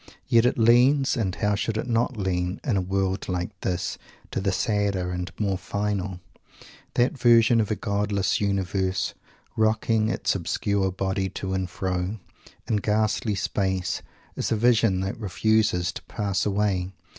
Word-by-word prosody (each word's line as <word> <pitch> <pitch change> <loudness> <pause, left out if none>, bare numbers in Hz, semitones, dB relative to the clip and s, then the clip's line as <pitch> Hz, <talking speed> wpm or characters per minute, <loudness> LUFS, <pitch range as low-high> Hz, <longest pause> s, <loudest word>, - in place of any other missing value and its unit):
Yet 115 +1 +5
it - - 0
leans, 125 +5 +4
and 100 -7 -1
how 105 -1 +1
should 110 +2 -1
it - - -2
not 120 +1 0
lean, 90 -1 -1
in 125 -7 0
a 95 - +2
world 95 +1 -1
like 90 +1 -2
this, 90 -1 -2 0.3
to - - -2
the 100 0 +1
sadder 100 -3 0
and 90 0 -3
the - - -11
more 100 -3 0
final. 100 -2 -2 0.8
That 125 +5 +2
vision 115 -1 +5
of 105 - -2
a 110 - +1
godless 100 -1 0
universe, 95 -1 0 0.4
"rocking 110 0 +2
its - - 0
obscure 95 +2 0
body 95 +1 -1
to 95 +1 -4
and 95 -1 -1
fro," 90 +3 -2 0.5
in 110 - +1
ghastly 105 +1 0
space, 95 -2 -1 0.3
is - - -2
a - - +3
vision 110 -4 +3
that 95 +4 -3
refuses 105 -3 +1
to - - -8
pass 100 -1 -1
away. 100 -2 0
100 Hz, 155 wpm, -25 LUFS, 95-110 Hz, 0.8 s, Yet